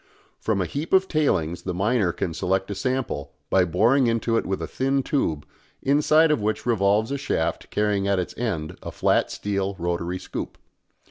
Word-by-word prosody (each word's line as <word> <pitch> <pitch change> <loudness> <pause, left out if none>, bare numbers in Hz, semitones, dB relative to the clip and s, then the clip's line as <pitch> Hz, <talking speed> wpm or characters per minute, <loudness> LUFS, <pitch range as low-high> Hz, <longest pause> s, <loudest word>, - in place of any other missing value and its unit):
From 105 -3 0
a - - 0
heap 145 - -4
of 190 0 +5
tailings 90 - 0
the 90 -2 -4
miner 100 0 +2
can 85 -1 -3
select 95 +3 -1
a - - 0
sample, 105 - -2 0.2
by 95 -1 +4
boring 115 - +3
into 115 0 +1
it - - 0
with 95 0 -1
a - - -3
thin 135 +1 0
tube, 80 - -1 0.4
inside 150 +3 +4
of 150 - +1
which 110 +1 -1
revolves 110 0 +2
a 140 - -2
shaft 80 -12 -2
carrying 105 -2 0
at 100 -1 +2
its 90 - -3
end 85 -10 -3
a - - -6
flat - - +2
steel 100 -1 -2
rotary 85 +1 -2
scoop. 90 - -6
105 Hz, 185 wpm, -24 LUFS, 90-130 Hz, 0.4 s, of